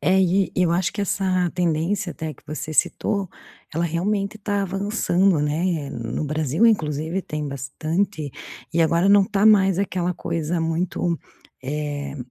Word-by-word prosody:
É, 190 +1 +3
e 185 -1 +2
eu 180 -2 +2
acho 175 0 +1
que 205 - -4
essa 185 -2 +1
tendência 175 +3 0
até 160 -1 -5
que - - -23
você 155 +1 -5
citou, 200 +5 +1 0.5
ela 170 +1 +1
realmente 195 +5 -1
tá 205 -1 -1
avançando, 195 -3 +1
né, 150 0 -1
no 115 +5 -3
Brasil 155 - +2
inclusive 160 -3 +1
tem 150 -1 -4
bastante. 155 +5 -2 0.4
E 170 - +3
agora 170 +4 +3
não 200 0 +7
está 205 0 +2
mais 195 -4 +5
aquela 180 -2 0
coisa 165 +1 -2
muito, 165 +1 -1 0.4
eh 145 0 -4
175 Hz, 145 wpm, -23 LUFS, 155-195 Hz, 0.5 s, não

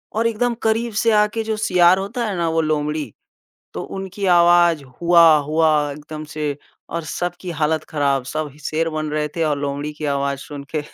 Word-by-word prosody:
और 230 +1 +2
एकदम 235 +2 0
करीब 225 +1 0
से 230 - +3
आ 210 -1 +5
के 225 -1 -2
जो 220 0 -2
सियार 180 -4 +4
होता 205 +5 -3
है 205 - -3
ना 170 - 0
वो 165 0 +1
लोमड़ी 150 -4 -2 0.6
तो - - -4 0.2
उनकी 195 +1 -5
आवाज़ 175 -3 +5 0.2
हुआ, 170 -2 +6
हुआ 150 0 +1
एकदम 150 +1 -8
से 150 -2 -3 0.3
और 170 0 -3
सबकी 175 +2 -4
हालत 155 0 0
ख़राब। 140 -3 0
सब 155 -2 -3
शेर 165 +1 0
बन 155 -1 -3
रहे 150 0 -1
थे 165 - 0
और 150 -2 0
लोमड़ी 145 +1 -3
की 150 0 -6
आवाज़ 140 0 -1
सुन 140 +1 -8
के 150 - +1
160 Hz, 190 wpm, -20 LUFS, 150-185 Hz, 0.6 s, हुआ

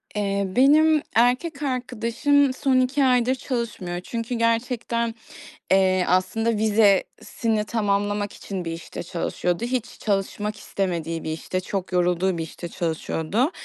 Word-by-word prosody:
Eee, 200 -1 0
benim 300 +8 +5
erkek 255 +6 +2
arkadaşım 255 +2 +1
son 265 -1 +2
2 260 +3 +2
aydır 250 0 +3
çalışmıyor 230 -9 -4
çünkü 230 +4 -4
gerçekten, 230 0 0 0.6
eee, 185 -1 +4
aslında 205 +5 +1
vizesini 215 +1 +2
tamamlamak 205 -1 -1
için 190 -3 -6
bir 165 - -3
işte 165 0 -7
çalışıyordu. 175 +2 -2
Hiç 245 -1 -3
çalışmak 205 +1 -2
istemediği 165 -5 -3
bir - - -4
işte, 165 +3 -3
çok 190 0 -4
yorulduğu 180 0 +1
bir 165 - -2
işte 170 +2 -8
çalışıyordu. 170 - -1
215 Hz, 125 wpm, -24 LUFS, 185-250 Hz, 0.6 s, benim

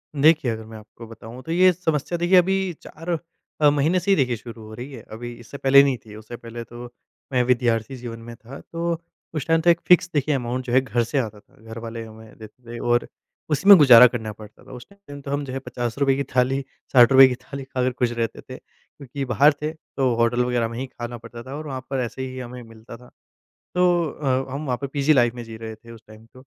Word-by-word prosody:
देखिए, 150 -3 +4
अगर 110 0 -5
मैं 110 0 -11
आपको 110 +2 -13
बताऊँ 115 +2 -11
तो 165 - -6
ये 185 +2 +5
समस्या 165 -1 -2
देखिए 175 +2 +4
अभी 190 0 +2
4 165 +3 -10 0.5
अ, 150 - +7
महीने 150 +5 +2
से 200 +3 0
ही 195 - +6
देखिए 125 -4 +1
शुरू 115 0 -11
हो 110 0 -11
रही 125 +5 -8
है। 115 - -9
अभी 120 +2 -7
इससे 120 +4 -10
पहले 140 +1 +6
नहीं 135 -2 +1
थी 105 -1 -12
उससे 110 +2 -9
पहले 115 0 -8
तो 120 +2 -10 0.5
मैं 125 -1 +3
विद्यार्थी 120 0 0
जीवन 120 -2 -8
में 115 +1 -10
था 125 +4 -12
तो 170 0 -3 0.4
उस 150 - -2
टाइम 165 0 +3
तो 175 - +3
एक 170 0 +4
फ़िक्स 180 0 +5
देखिए 145 0 +1
अमाउंट 125 0 -3
जो 120 - -4
है 130 - +5
घर 120 -2 -1
से 130 +6 -3
आता 110 -4 -4
था। - - -28
घरवाले 115 +1 -7
हमें 110 0 -14
देते 110 +3 -14
थे 120 0 -7
और 120 0 +1 0.4
उसी 150 +6 -1
में 200 - +12
गुज़ारा 125 -5 +9
करना 110 -3 -5
पड़ता 105 0 -15
था - - -15
उस 125 -1 -10
टाइम 200 0 -21
टाइम 145 0 -9
तो 140 - -7
हम 145 0 -1
जो 130 - -7
है 135 - -3
₹50 125 +2 -1
की 140 - -1
थाली, 130 +2 +2 0.3
₹60 130 +2 +8
की 125 - -2
थाली 140 +2 -9
ख़ाकर 130 -1 -1
ख़ुश 125 -1 +1
रहते 115 -1 -3
थे। - - -10
क्योंकि 140 0 -10
बाहर 140 +4 +4
थे 155 +1 -2
तो 135 -5 -2
होटल 120 +1 +2
वग़ैरह 120 -2 0
में 115 0 -7
ही 130 - -3
ख़ाना 120 -1 -7
पड़ता 115 +1 -11
था 135 +2 -8
और 155 0 -7
वहाँ 130 -2 -5
पर 135 -1 -2
ऐसे 125 +3 -7
ही 130 0 -8
हमें 125 0 -8
मिलता 115 0 -13
था। 125 +1 -17 0.7
तो 180 0 +4 0.2
अ, 135 -2 -2
हम 150 +2 -4
वहाँ 125 -2 -1
पे 140 - -2
पीजी 140 +2 +2
लाइफ़ 120 -3 +3
में 120 - -6
जी 115 -1 -10
रहे 110 0 -7
थे 115 +1 -16
उस 115 -2 -13
टाइम 110 +1 -15
तो। 130 - -15
125 Hz, 245 wpm, -23 LUFS, 115-140 Hz, 0.7 s, में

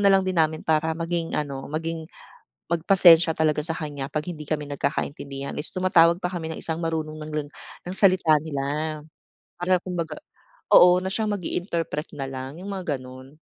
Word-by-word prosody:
nalang 195 -1 +5
din 185 -1 -2
namin 155 0 0
para 160 0 +2
maging 165 0 -2
ano, 140 -2 -4
maging 160 +1 -4 0.6
mag 170 -1 +1
pasensya 175 -4 +7
talaga 155 -1 +2
sa 165 +1 -3
kanya 145 -4 -5
pag 150 0 -2
hindi 160 -4 -6
kami 150 -2 -1
nagkakaintindihan 140 -1 -3
is 150 - +2
tumatawag 170 -2 +4
pa 180 - -2
kami 165 -3 -4
ng 160 - -5
isang 160 0 -2
marunong 160 -2 -2
ng 155 - -7
ling 150 -1 -3 0.4
ng 180 - -4
salita 185 -5 +5
nila. 150 +1 -3 0.6
Para 180 +1 +3
kumbaga 175 -3 -4 0.6
oo 180 0 +8
na - - -2
siyang 215 +1 -1
mag-interpret 170 -4 -3
na 135 -2 -4
lang 135 +3 -7
yung 200 - -7
mga 180 -9 -3
ganun. 130 +3 -12
160 Hz, 175 wpm, -24 LUFS, 150-175 Hz, 0.6 s, oo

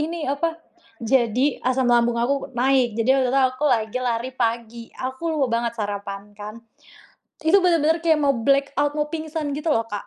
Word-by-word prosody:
Ini 325 +1 -3
apa? 325 +3 -2 0.5
Jadi 250 +3 +1
asam 255 +1 0
lambung 240 0 +3
aku 265 +3 -1
naik, 250 -2 +2
jadi 255 +4 +3
waktu 255 - +1
itu 270 +2 +2
aku 255 +3 -5
lagi 225 -2 0
lari 240 0 -2
pagi. 235 -1 -2
Aku 260 +5 -5
lupa 260 -6 +1
banget 235 -1 -3
sarapan 205 -1 -5
kan. 210 +1 -9 0.9
Itu 320 +6 +5
bener-bener 335 -3 +2
kayak 320 -2 +2
mau 280 -2 +2
black 275 +4 +2
out, 290 0 +1
mau 300 0 -1
pingsan 315 -2 -4
gitu 305 +1 0
loh 225 -2 0
Kak. 205 0 -5
260 Hz, 180 wpm, -22 LUFS, 230-295 Hz, 0.9 s, Itu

